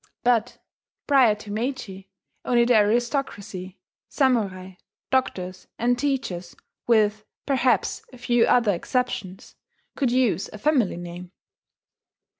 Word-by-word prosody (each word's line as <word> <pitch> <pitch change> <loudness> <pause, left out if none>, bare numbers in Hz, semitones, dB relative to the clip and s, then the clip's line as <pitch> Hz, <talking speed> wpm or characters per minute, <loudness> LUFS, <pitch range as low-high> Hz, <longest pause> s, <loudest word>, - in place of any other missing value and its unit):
But, 240 -1 +2 0.5
prior 260 -7 +5
to 210 0 -10
Meiji, 215 -4 -4 0.3
only 240 -1 +3
the 245 - +3
aristocracy, 210 -4 0 0.3
samurai, 200 -9 0 0.4
doctors, 185 -8 -1
and 245 +1 +2
teachers 245 -11 -3 0.3
with 215 -2 +3 0.2
perhaps 265 -2 +1
a 255 - -13
few 240 -1 +2
other 230 -4 +4
exceptions 190 -1 -3 0.4
could 260 -4 0
use 245 -8 +1
a - - -8
family 250 - +1
name. 175 +1 -8
225 Hz, 105 wpm, -24 LUFS, 190-250 Hz, 0.5 s, prior